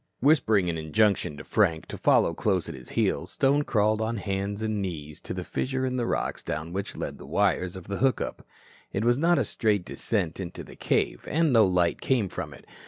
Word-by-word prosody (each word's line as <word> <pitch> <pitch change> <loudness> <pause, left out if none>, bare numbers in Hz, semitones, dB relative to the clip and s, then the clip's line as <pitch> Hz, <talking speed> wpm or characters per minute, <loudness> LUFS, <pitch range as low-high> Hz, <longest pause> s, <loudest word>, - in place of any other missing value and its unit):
Whispering 115 - +3
an 80 -2 -1
injunction 85 -1 +1
to - - -8
Frank 80 -1 +1
to - - -5
follow 85 - +3
close 95 0 0
at - - -5
his 65 -2 -10
heels, - - 0
Stone 145 +2 +2
crawled 110 -1 +2
on 115 +1 -1
hands 100 +1 -3
and 110 -2 -1
knees 75 -5 -5
to - - -7
the 90 0 -3
fissure 130 +6 -2
in 130 0 -1
the 120 -1 0
rocks - - -2
down 80 +3 -4
which 100 +2 -4
led - - -5
the - - -10
wires 90 +2 +1
of 95 - -8
the 100 0 -3
hook 130 +1 +2
up. - - -5 0.5
It 100 +4 -1
was 120 +2 +3
not 170 +2 +4
a 135 - +2
straight 105 -3 0
descent 95 -7 -1
into 90 -3 -6
the - - -12
cave, - - -1
and 160 -3 +2
no 115 -2 +7
light 90 -2 +1
came 120 -8 +1
from 85 -4 -5
it. 65 - -13
100 Hz, 220 wpm, -27 LUFS, 90-115 Hz, 0.5 s, no